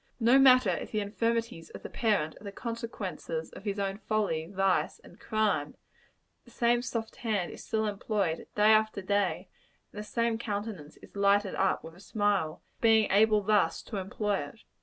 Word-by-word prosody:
No 240 +3 +5
matter 255 -1 +6
if - - -4
the 215 - -1
infirmities 225 -4 -2
of - - -11
the - - -5
parent 205 -9 0
are - - -13
the 200 - -6
consequences 200 -8 -5
of 195 - -12
his 200 -1 -2
own 195 0 -2
folly, 205 -8 -1
vice 195 0 0
and - - -17
crime, 215 -1 0 0.7
the - - -19
same 240 0 +2
soft 230 -2 -4
hand 210 -7 -1
is - - -10
still 220 -1 -1
employed, 200 -4 -2
day 210 +1 +5
after 215 -2 +2
day 195 -1 0 0.5
and 210 - -7
the - - -4
same 230 +1 -1
countenance 205 -8 -5
is - - -15
lighted 200 0 +3
up 190 0 +1
with 160 - -10
a 175 - -17
smile, 200 -6 -1
at - - -38
being 220 -2 +4
able 210 +1 +4
thus 210 0 +2
to 215 - -6
employ 200 +1 -1
it. 145 +10 -8
210 Hz, 180 wpm, -29 LUFS, 195-225 Hz, 0.7 s, matter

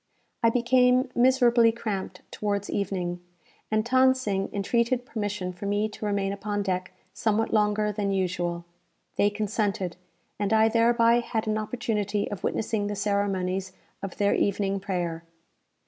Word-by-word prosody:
I 230 - +5
became 250 +2 +3
miserably 240 -2 +4
cramped 215 -4 -5
towards 205 -1 -2
evening; 180 -3 -2 0.5
and 215 0 +1
Than 260 +1 +4
Sing 200 -7 -2
entreated 235 +5 0
permission 205 -5 -3
for 190 +3 -6
me 205 +1 +1
to 215 - -7
remain 200 -1 0
upon 205 0 -3
deck 185 -2 -2 0.2
somewhat 225 0 0
longer 210 0 +2
than 205 -1 -1
usual. 175 -2 -1 0.5
They 205 - +4
consented, 205 -4 -2 0.4
and 205 +1 0
I 220 0 +5
thereby 230 +1 +4
had 230 -2 -2
an 215 0 0
opportunity 210 -2 -2
of 205 - -6
witnessing 215 -2 -1
the 205 - -3
ceremonies 195 -2 -1 0.3
of 195 -2 -6
their 200 -1 +2
evening 195 0 0
prayer. 175 -4 -3
205 Hz, 140 wpm, -26 LUFS, 195-230 Hz, 0.5 s, I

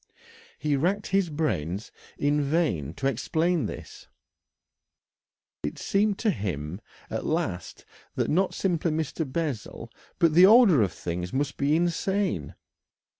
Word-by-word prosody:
He 150 -2 0
racked 185 +9 0
his 195 -2 +2
brains 110 - -2 0.3
in 145 +1 +1
vain 140 - 0
to - - -5
explain 160 +6 +1
this. - - -9 1.5
It 75 - -4
seemed 200 0 +1
to 220 - +1
him 90 - -4 0.3
at - - -2
last - - -3 0.3
that - - 0
not 185 +4 +1
simply 175 -3 0
Mr. 155 -2 -2
Bessel, 130 -7 -4 0.3
but 165 -2 +3
the 180 +3 +8
order 210 - +7
of 95 -4 +1
things 90 +1 -4
must 140 +1 -1
be 145 +2 +2
insane. 175 - 0
155 Hz, 125 wpm, -27 LUFS, 110-175 Hz, 1.5 s, the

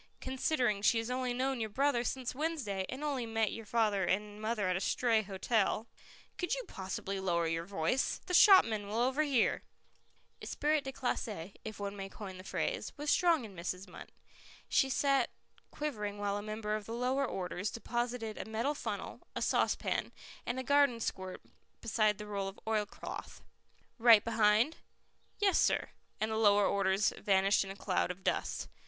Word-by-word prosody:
"Considering 255 -5 0
she 225 - +4
has 225 +2 -2
only 255 0 -1
known 260 +1 -1
your 220 -1 -2
brother 265 +2 +1
since 255 0 -3
Wednesday, 255 - -2
and 265 +4 -5
only 270 -6 -1
met 225 -1 0
your 225 -2 -7
father 215 -4 +2
and 210 +3 -1
mother 215 -3 0
at 185 - +1
a - - 0
stray 225 +3 +2
hotel 210 +2 0 0.3
" - - -24
"Could 360 +6 0
you - - -4
possibly 195 +1 -4
lower 170 -3 +1
your 165 +1 -1
voice? 195 +7 0
The 360 - -4
shopman 230 - +6
will 210 +2 -3
overhear." 265 +1 +2 0.8
"Esprit 300 0 0
de 270 - -5
classe" 210 -8 -3
if 215 -1 -7
one 200 0 -4
may 195 -1 -6
coin 195 -3 -8
the - - -9
phrase - - -2
was 295 +1 0
strong 335 -8 +3
in 200 -3 -11
Mrs. 180 +2 -4
Munt. 185 - -11 0.6
She 270 - +3
sat 275 -1 +2 0.4
quivering 210 -9 -4
while 205 0 -1
a 205 - -2
member 215 0 -3
of 215 -1 -5
the 225 - -4
lower 255 +3 +1
orders 185 +1 -3
deposited 235 -1 -3
a - - -4
metal 230 +6 0
funnel, - - -5
a - - -2
saucepan, - - 0 0.4
and 240 - -1
a - - -3
garden 285 -3 +4
squirt 190 -4 -4 0.4
beside 215 -2 +1
the 210 - -7
roll 200 -2 -3
of 195 - -8
oilcloth. 215 -2 -4 0.6
"Right 225 -3 +7
behind?" 225 +5 +3 0.6
"Yes, 395 -2 +3
sir." - - +2 0.3
And 215 +1 0
the 220 - -1
lower 205 -2 +5
orders 195 +1 +2
vanished 195 0 +3
in 195 - -8
a 195 - -6
cloud 190 -3 0
of 180 +1 -6
dust. - - -1
220 Hz, 175 wpm, -33 LUFS, 200-255 Hz, 0.8 s, Right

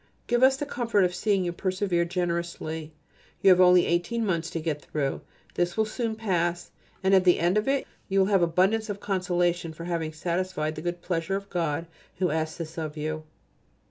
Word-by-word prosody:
Give 240 0 +1
us 265 +1 +6
the 290 - -3
comfort 230 -7 +1
of 180 -1 +1
seeing 200 -1 +1
you 175 - -1
persevere 185 -1 0
generously. 170 -3 -3 0.5
You 195 - +8
have 185 0 +6
only 180 -1 +6
eighteen 175 +7 0
months 170 -4 -1
to 165 - -3
get 155 -2 -2
through. 145 -2 -2 0.3
It 175 +2 0
will 220 - +3
soon 225 +1 -3
pass, 175 -5 -1 0.3
and 190 +1 +3
at 190 -1 +6
the 180 -1 +5
end 175 +3 +2
of 215 +3 +1
it 275 0 +1 0.2
you 195 - 0
will 190 - +5
have 195 -2 +3
abundance 190 +6 +2
of 200 -1 -4
consolation 175 -4 0
for 165 - -9
having 165 -3 -2
satisfied 170 -1 -2
the 155 - -7
good 175 +1 -4
pleasure 175 +1 -1
of 200 0 -6
God 165 -2 -1 0.3
who 180 -2 +1
asks 160 0 -2
this 165 -1 -6
of 155 -1 -5
you. 155 +1 -3
175 Hz, 200 wpm, -27 LUFS, 165-195 Hz, 0.5 s, You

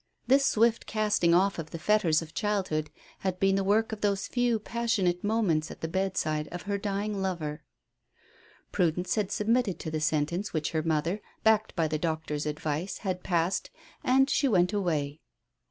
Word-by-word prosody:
This 270 +1 +4
swift 230 +1 +2
casting 210 -6 +2
off 195 +1 +2
of 155 -1 -5
the 165 - -6
fetters 170 -4 +2
of 155 - -12
childhood 185 -7 -1 0.3
had 185 -1 -2
been 195 0 +3
the 195 - +1
work 215 +4 +2
of 215 -1 -5
those 200 -2 0
few 245 -2 +1
passionate 215 -5 0
moments 205 -8 +1
at - - -10
the 160 - -2
bedside 160 -4 -1
of 175 0 -7
her 200 0 -2
dying 200 0 -2
lover. 165 -5 -3 1.1
Prudence 180 -1 +1
had 210 -3 -1
submitted 225 -2 +1
to 160 - -6
the 155 0 -2
sentence 155 +6 0
which 155 -2 -1
her 160 - 0
mother, 165 +5 0 0.2
backed 220 0 +3
by 165 -2 +1
the 155 0 -2
doctor's 155 -2 -2
advice, 150 +4 -3
had 185 -1 -1
passed, 175 0 0 0.3
and 265 +1 +4
she 280 - +2
went 180 -4 +3
away. 155 -7 -1
185 Hz, 170 wpm, -28 LUFS, 160-210 Hz, 1.1 s, This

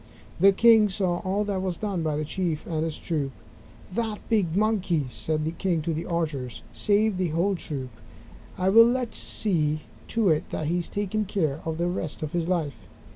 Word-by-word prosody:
The 195 +3 +7
king 220 +1 +6
saw 185 -3 0
all 195 +2 0
that 200 -2 -2
was 185 -3 -2
done 200 -5 -2
by 155 -2 0
the 155 - -2
Chief 165 -1 -2
and 160 -2 -1
his 160 -1 -3
troop. 150 -5 -2 0.6
"That 220 0 -1
big 195 -8 +2
Monkey," 195 -8 +1
said 155 +4 -2
the 160 - -1
king 170 -2 -1
to 165 - -1
the 160 +2 -4
archers, 150 - -3
"saved 205 -1 +2
the 185 - +1
whole 170 +5 +1
troop. 135 -8 -5 0.7
I 185 +1 +2
will 230 +4 +7
see 155 -7 0 0.3
to 225 -4 +2
it 155 -1 +1
that 155 - -3
he 170 +4 +1
is 170 - -5
taken 205 +1 -1
care 160 -7 -1
of 160 -1 -2
the 170 +1 0
rest 165 -4 -3
of 150 - -3
his 170 -1 -1
life." 165 -6 -1
175 Hz, 190 wpm, -26 LUFS, 155-200 Hz, 0.7 s, The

